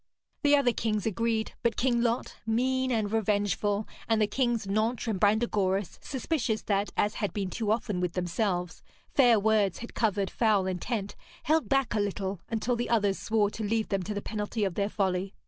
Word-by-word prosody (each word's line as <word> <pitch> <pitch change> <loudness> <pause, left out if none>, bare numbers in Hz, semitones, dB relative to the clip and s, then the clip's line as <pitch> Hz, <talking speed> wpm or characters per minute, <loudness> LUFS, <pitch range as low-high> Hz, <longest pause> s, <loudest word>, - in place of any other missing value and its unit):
The 290 -1 +5
other 260 -4 +3
kings 215 -3 -1
agreed, 225 +1 0
but 235 -2 0
King 240 -2 +2
Lot, 235 0 -1
mean 260 +4 +1
and 215 -3 0
revengeful, 205 -1 0 0.2
and 225 -1 +3
the 215 - +4
Kings 235 0 0
Nentres 220 +5 0
and 210 -4 -1
Brandegoris, 205 -3 +1
suspicious 260 -4 -2
that, 200 0 0
as 205 +1 +2
had 205 - -1
been 195 -3 -3
too 220 -3 -2
often 215 -4 -1
with 180 -1 -1
themselves, 180 -1 -1 0.3
fair 240 -5 +5
words 210 -2 +2
had 235 - -8
covered 205 -4 0
foul 215 -5 +2
intent, 195 +3 -3 0.3
held 315 +1 +1
back 270 -3 +2
a 215 - +1
little, 195 -2 -2
until 230 +2 0
the 240 +1 -2
others 205 -4 +2
swore 210 -2 +1
to 220 - -5
leave 220 +1 0
them 195 -1 0
to 210 +3 -4
the 205 - -3
penalty 215 +1 -3
of 190 -3 0
their 200 +2 0
folly. 190 -1 -1
215 Hz, 185 wpm, -28 LUFS, 200-235 Hz, 0.3 s, The